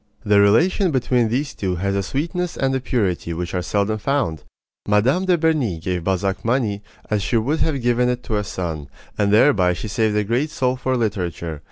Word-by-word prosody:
The 105 -1 +5
relation 175 - +3
between 125 -4 +1
these 135 +5 -1
two 95 -2 -2
has 100 +3 -1
a 100 - +1
sweetness 165 - -3
and 135 0 0
a 130 - +1
purity 95 -9 -1
which 85 +1 -4
are 90 - 0
seldom 105 +3 -1
found. 105 - -1 0.4
Mme. 120 - +2
de 180 -2 +3
Berny 155 - +1
gave 90 0 -3
Balzac 95 +1 -1
money 115 -4 0 0.3
as 105 -1 +1
she 115 - 0
would 140 +8 0
have 140 -6 0
given 120 +1 +2
it 125 -1 -2
to 110 - -2
a 105 - -1
son, 85 -7 -5 0.3
and 100 -1 +1
thereby 105 -5 +4
she 90 +5 -5
saved 110 0 0
a 105 - +2
great 120 +9 0
soul 130 -3 0
for 130 0 -1
literature. 90 -8 -3
110 Hz, 200 wpm, -21 LUFS, 95-130 Hz, 0.4 s, The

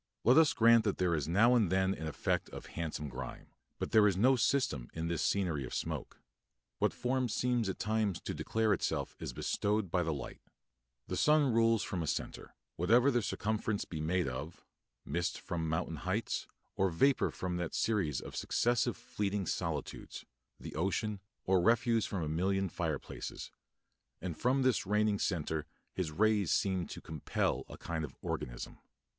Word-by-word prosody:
Let 125 +3 +6
us 160 -2 +6
grant 115 0 +6
that 100 - 0
there 90 -2 +2
is 75 -3 -1
now 105 +9 +5
and 110 -8 +3
then 95 0 +2
an 80 -4 -5
effect 80 - -1
of - - -8
handsome 80 -3 -4
grime, 65 -1 -7 0.3
but - - -4
there 110 -1 +6
is 95 -3 +1
no 130 +6 +5
system 120 - +1
in 80 0 -2
this 85 -2 -1
scenery 85 -9 +1
of 65 - -6
smoke. - - -4 0.6
What - - +3
form 130 0 -1
seems 120 -2 +1
at 95 - -3
times 105 -4 0
to - - -4
declare 110 -2 +1
itself - - -2
is - - -4
bestowed 100 +8 -1
by 90 - +2
the 80 -1 0
light. 70 - -6 0.6
The - - -3
sun 150 -4 +4
rules 115 -1 +4
from 90 - -3
a 80 - -3
centre, - - -4 0.2
whatever 120 +10 +4
the 120 -2 +2
circumference 105 0 -1
be 80 -3 -5
made 85 +2 +1
of 75 +6 -6 0.4
mist 85 +4 -2
from 80 -2 -3
mountain 80 - -1
heights - - -2 0.3
or 95 0 +2
vapour 135 +11 +3
from 90 -1 -3
that 85 -2 -3
series 90 - +1
of - - -9
successive 120 0 +1
fleeting 100 -1 -2
solitudes, - - -4 0.3
the - - -8
ocean, 100 +5 -1 0.2
or 95 -1 +3
refuse 115 +2 +3
from 95 -4 -2
a - - -2
million 95 +5 0
fireplaces; - - -4 0.7
and 85 -2 -4
from 130 - +2
this 130 -6 +2
reigning 105 0 +2
centre 80 -4 -1 0.3
his 90 -5 -2
rays 105 +1 +2
seem 95 -3 +1
to - - -8
compel 80 -3 -1
a - - -9
kind 85 -2 -3
of 75 - -6
organism. - - -4
95 Hz, 175 wpm, -33 LUFS, 80-115 Hz, 0.7 s, Let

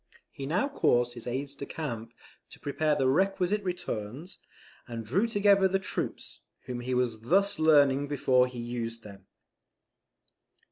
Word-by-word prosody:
He 135 - -6
now 180 - +1
caused 120 - +2
his 120 -1 -9
aides 135 +3 -3
de 140 0 -8
camp 115 -7 -5 0.3
to - - -14
prepare 150 +1 0
the 135 - +1
requisite 190 +6 +2
returns, 160 - -5 0.5
and 115 -2 -6
drew 190 - +1
together 200 -3 +4
the 190 +1 +1
troops, 190 - -4 0.3
whom 125 -1 -4
he 125 +1 -2
was 120 -3 0
thus 195 - +2
learning 145 -3 +4
before 130 -3 +3
he 125 -1 -10
used 115 -1 -4
them. 100 -2 -13
135 Hz, 145 wpm, -29 LUFS, 120-180 Hz, 0.5 s, together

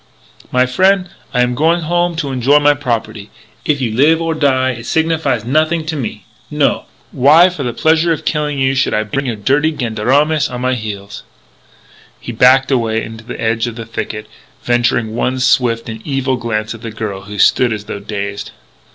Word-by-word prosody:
My 125 0 +3
frien', 185 +7 +2 0.2
I 125 - +1
am 125 0 0
going 165 +6 +2
home 175 +1 0
to 150 -4 -3
enjoy 130 +3 +3
my 145 0 +4
property. 115 -6 -4 0.4
If 145 -2 0
you 120 -3 -1
live 150 +7 +4
or 165 -1 -1
die 130 -4 +1
it 115 -2 -8
signifies 160 -8 0
nothing 155 +5 +1
to 155 0 -3
me. 115 -7 -5 0.2
No! - - 0 0.3
Why, 155 +8 +5
for 175 -5 -7
the 125 -3 -2
pleasure 160 +6 +2
of 160 - -2
killing 150 -2 -1
you, 135 0 +1
should 130 - +1
I 110 - +1
bring 135 +6 -3
your 120 - -2
dirty 140 +9 +1
gendarmes 140 +7 +1
on 125 0 -6
my 130 0 +1
heels?" 105 -4 -6 1.0
He - - -7
backed 130 +4 +4
away 115 -3 +1
to 110 0 -10
the 120 - -8
edge 115 +1 0
of 115 - -6
the 115 -1 -7
thicket, 105 -1 -5 0.4
venturing 120 -2 +1
one 130 +2 -1
swift 125 -3 +1
and 110 -1 -7
evil 135 -2 -1
glance 110 -3 -3
at 115 - -11
the 115 - -6
girl 105 -3 -6
who 105 +1 -8
stood 115 +5 +3
as 105 -1 -4
though 100 - -6
dazed. 100 0 -5
125 Hz, 190 wpm, -16 LUFS, 110-150 Hz, 1.0 s, Why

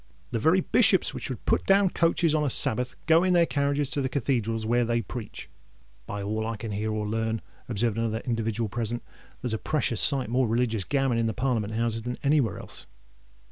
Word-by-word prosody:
The 115 - -1
very 160 +10 +3
Bishops - - +3
which - - -4
would - - -6
put - - +2
down 195 -1 +4
coaches 165 -1 +2
on 155 -1 +2
a 145 - +1
Sabbath, 125 +1 +2
goes 165 +3 +4
in 185 - +3
their 170 -1 +5
carriages 140 -1 0
to 145 - -1
the 130 - -1
Cathedrals 115 -5 -1
where 120 +2 +2
they 115 0 0
preach." 120 -2 -7 0.6
"By 100 0 -4
all 110 +2 -2
I 115 -1 -3
can 110 0 -6
hear 105 +2 -2
or 105 0 -2
learn," 110 +1 -1 0.3
observed 115 0 0
another 115 -1 -1
individual 115 -1 -1
present, 120 +2 -3 0.4
"there's 125 -3 -1
a 110 - -1
precious 140 -7 0
sight 135 -4 +3
more 125 +2 +1
religious 115 -3 0
gammon 135 -4 +1
in 115 - +1
the 110 - -2
Parliament 115 -4 -1
Houses 115 0 0
than 125 +2 -4
anywheres 140 - +1
else." - - -12
120 Hz, 205 wpm, -26 LUFS, 110-140 Hz, 0.6 s, their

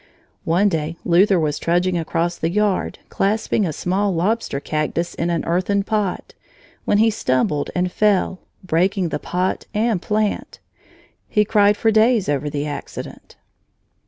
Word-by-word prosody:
One 175 +5 +3
day 165 -3 -2
Luther 185 +2 +4
was 150 -2 -1
trudging 175 +2 +1
across 170 +1 -1
the 165 - -2
yard, 205 +1 0
clasping 210 0 0
a - - -2
small 190 +6 0
lobster 185 -4 0
cactus 155 +4 -2
in 170 - -2
an 170 -1 -1
earthen 185 +4 +1
pot, 210 -3 -2 0.5
when 205 - +2
he 225 +1 +4
stumbled 145 -5 0
and 180 0 0
fell, 195 -2 +1 0.2
breaking 185 +1 +1
the - - -3
pot 180 +1 -2
and 215 -3 +1
plant. 210 +1 -1 0.7
He 210 0 +2
cried 205 -1 +3
for 225 - +2
days 220 -1 +3
over 145 0 -1
the 145 0 -3
accident. 145 -1 -8
185 Hz, 145 wpm, -21 LUFS, 165-210 Hz, 0.7 s, Luther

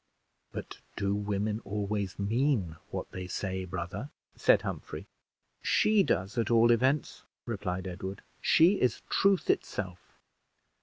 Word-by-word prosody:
"But - - -7 0.2
do 100 0 0
women 105 +1 -1
always 100 -1 -2
mean 105 - +1
what - - -5
they 95 -1 -5
say, 95 0 -3
brother?" 90 +9 -5 0.3
said - - +4
Humphrey. - - -5 0.6
"She 215 -1 +4
does, 100 - 0
at 115 - +1
all 115 0 +6
events," 130 +5 +2 0.2
replied 95 -5 -3
Edward; 95 +1 -5 0.2
"she 175 +5 +5
is 125 -3 +1
truth 195 -2 +3
itself. 95 -3 -2
105 Hz, 120 wpm, -30 LUFS, 95-120 Hz, 0.6 s, all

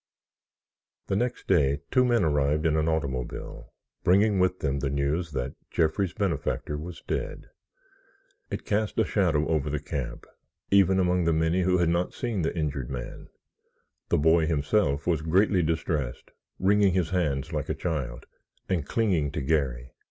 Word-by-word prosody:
The - - -1
next 125 +4 -1
day 70 -2 +3
two 130 0 +4
men 120 -4 +3
arrived 75 0 +1
in 80 -1 +3
an 80 +1 +1
automobile, 65 -5 -4 0.3
bringing 100 +2 +4
with 90 0 +2
them 70 -4 -1
the 70 0 -1
news 70 +4 -1
that 65 -1 -3 0.2
Jeffrey's 85 +3 +1
benefactor 85 -5 -1
was 85 +3 -7
dead. - - -4 1.0
It - - -5
cast 105 -1 -1
a - - +3
shadow 75 +1 +1
over 75 -3 0
the 75 0 -1
camp 70 -5 -5 0.5
even 95 -1 +5
among 90 -1 +2
the 85 - +3
many 80 +3 +1
who 90 0 +3
had 85 -2 +2
not 85 +1 0
seen 115 -7 -2
the 80 - -2
injured 70 -5 -2
man. 60 -2 -7 0.8
The - - +3
boy 80 +1 +4
himself 75 0 +1
was 85 -3 +1
greatly 90 +4 +3
distressed, 75 -5 -2 0.3
wringing 100 0 +3
his 90 -4 0
hands 75 -7 -1
like - - -3
a - - 0
child, 65 -8 -3 0.4
and 85 -6 -1
clinging 90 -11 +1
to 75 - -2
Garry. 65 -4 -1
80 Hz, 160 wpm, -27 LUFS, 70-90 Hz, 1.0 s, even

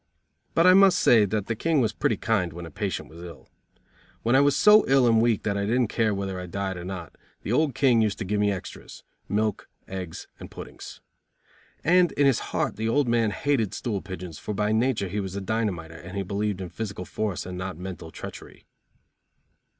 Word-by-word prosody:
But 165 - +4
I 185 - +8
must 190 -1 +6
say 110 -3 +5
that 105 0 -2
the 115 - -2
King 160 +6 +1
was 115 -4 +1
pretty - - 0
kind 90 -7 0
when 85 +1 -7
a 80 - -10
patient - - -3
was 85 +2 -13
ill. 85 -3 -11 0.8
When 120 +3 +3
I 135 - +6
was 140 0 +3
so 210 +1 +7
ill 135 -1 +4
and 115 -2 +4
weak 115 -3 +2
that 100 -2 -1
I 100 - -1
didn't 120 0 +1
care 110 -2 +1
whether 95 -2 -3
I 90 - -6
died 95 +1 -3
or 90 - -7
not, 90 -3 -7 0.3
the - - -3
old 140 +2 +2
King 125 -5 +4
used 105 -2 0
to 110 - -4
give 105 +2 -1
me 105 0 +2
extras, 95 -2 -8 0.3
milk, 105 +1 -1 0.2
eggs 95 -3 -6
and - - -9
puddings. - - -10 0.8
And 180 0 +4
in 145 - +2
his 135 -3 +4
heart - - -1
the 110 +1 -1
old 140 +2 +2
man 115 -2 +2
hated 115 -3 0
stool 105 -6 -3
pigeons, 90 -4 -8
for 105 - -5
by 105 +1 0
nature 110 -2 +1
he 100 +3 -3
was 95 -1 -4
a - - -2
dynamiter 95 -6 -2
and 95 +2 -6
believed 100 -1 -2
in 90 - -5
physical 100 -3 -5
force 105 -3 -3
and 90 0 -6
not 95 -1 -5
mental 90 -2 -7
treachery. - - -10
105 Hz, 210 wpm, -26 LUFS, 95-120 Hz, 0.8 s, I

